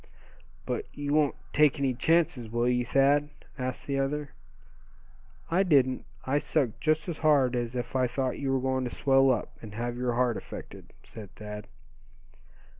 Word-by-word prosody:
"But 430 - -2
you 145 0 -2
won't 150 -2 +3 0.2
take 150 -1 +4
any 135 -2 +1
chances, 140 -3 +1
will 120 +2 0
you, 125 0 +2
Thad?" 140 +4 +3 0.3
asked 130 0 -4
the 140 -1 -1
other. 145 +1 -2 1.2
"I 180 +3 +4
didn't. 135 -8 +3 0.2
I 140 +2 +2
sucked 125 -8 -1
just 155 0 +1
as 170 -4 -4
hard 140 -5 +3
as 120 0 -2
if 120 +1 -4
I 130 -1 +3
thought 130 +1 -2
you 135 -1 -1
were 135 - +2
going 130 0 0
to 125 - -2
swell 135 +1 +3
up, 120 -4 0
and 105 -2 -9
have 120 +1 -3
your 125 -1 0
heart 120 -1 +1
affected," - - -10
said 105 -3 -10
Thad. 105 -1 -8
130 Hz, 170 wpm, -28 LUFS, 120-145 Hz, 1.2 s, take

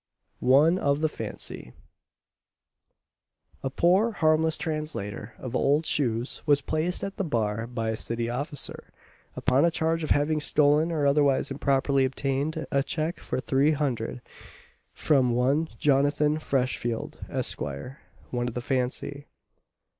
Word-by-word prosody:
ONE 150 +8 +4
OF 140 -2 +1
THE 160 - +3
FANCY. 65 - -6 1.9
A 135 - -2
poor 185 - +3
harmless 160 -2 +2
translator 150 - -4
of 130 -1 -6
old 145 +5 +2
shoes 120 -5 -1
was 145 -1 +5
placed 160 +5 -1
at 195 0 -5
the - - -1
bar 115 - -1
by 115 -2 -2
a - - -2
city 115 +1 -2
officer, 140 +4 -3 0.5
upon 130 +2 +2
a 170 - +5
charge 165 0 0
of 155 - -3
having 150 +2 +2
stolen, 150 +2 +3
or 150 -3 0
otherwise 140 -1 +3
improperly 135 0 +1
obtained, 140 +4 -1
a 140 - +3
cheque 155 +5 -2
for - - -3
300_l._ 135 -3 0 0.7
from 130 -6 +2
one 140 +6 +2
Jonathan 145 +2 +2
Freshfield, 125 -5 -2
Esquire, 75 - -4 0.3
"one 120 -1 -1
of 120 - -5
the - - -1
Fancy." 135 +3 -2
140 Hz, 130 wpm, -27 LUFS, 125-155 Hz, 1.9 s, was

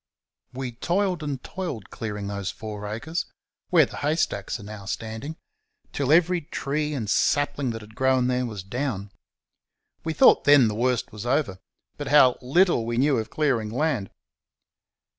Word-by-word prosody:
We 130 -1 -5
toiled 180 - 0
and 145 -4 -4
toiled 165 - -6
clearing 105 -3 -5
those 100 -1 -3
four 105 -1 -6
acres, 150 +11 -3 0.4
where - - +6
the - - -10
haystacks 145 - -1
are - - -10
now 100 -1 -9
standing, 110 +10 -5 0.6
till 140 -1 0
every 175 +2 +4
tree 150 0 -2
and 115 -6 -3
sapling 145 +3 +1
that 115 -1 -4
had 105 +1 -14
grown 130 +1 +2
there 125 0 0
was 105 -5 -6
down. 105 -2 -3 0.9
We 160 - -2
thought 150 - +6
then 145 -4 +7
the - - -3
worst 125 +2 0
was 110 +2 -7
over; 125 -8 0 0.4
but - - -5
how 130 -4 +5
little 155 +1 +3
we 115 +1 -2
knew 135 0 +3
of 110 0 -4
clearing 130 -8 0
land! 130 -4 -1
125 Hz, 160 wpm, -25 LUFS, 110-150 Hz, 0.9 s, then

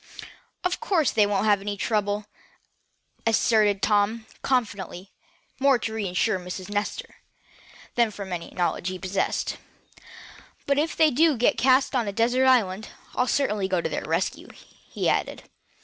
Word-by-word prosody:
"Of 360 0 -1
course 370 - +1
they 210 -2 +3
won't 205 0 0
have 205 -2 +3
any 205 0 -4
trouble," 205 -1 -1 1.0
asserted 215 -3 +3
Tom, 215 +2 +2 0.2
confidently, 205 -7 -2 0.5
more 275 -1 +4
to 225 -2 -4
reassure 200 -1 0
Miss 180 +1 -7
Nestor, 205 0 -4 0.8
than 235 -2 +3
from 200 -3 -7
any 170 -1 -5
knowledge 175 0 -2
he 185 0 -3
possessed; 190 +1 -2 1.1
"but 280 0 +2
if 320 +2 -1
they 315 -1 +5
do 305 +1 +3
get 240 - +3
cast 260 +1 +3
away 260 - +2
on 225 - -5
a 200 - -3
desert 245 +4 +2
island, 215 -5 +2 0.3
I'll 250 - +1
certainly 210 -9 0
go 185 -2 0
to - - -2
their - - -3
rescue," - - -2
he - - -6
added. - - -1
215 Hz, 150 wpm, -25 LUFS, 195-250 Hz, 1.1 s, they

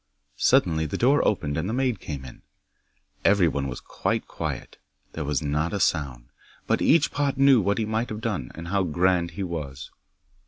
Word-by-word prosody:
'Suddenly 80 +1 +3
the - - -3
door 135 +4 +3
opened 75 -8 0
and 80 +6 -2
the - - -2
maid 125 -5 0
came 70 -4 -6
in. 65 - -12 0.8
Everyone 85 -8 +3
was 65 -2 -5
quite - - -2
quiet. - - -5 0.3
There 80 - -4
was 75 0 -1
not 75 +4 -1
a 100 - -1
sound. 70 -9 -1 0.4
But - - +1
each 155 -1 +4
pot 140 -2 -1
knew 135 -3 +6
what 100 +1 0
he 110 - 0
might 110 +2 -1
have 110 0 -5
done, 105 - -3
and 85 +1 -7
how 100 +1 +1
grand 90 0 +1
he 100 - -2
was. 75 -6 -6
90 Hz, 185 wpm, -25 LUFS, 75-110 Hz, 0.8 s, knew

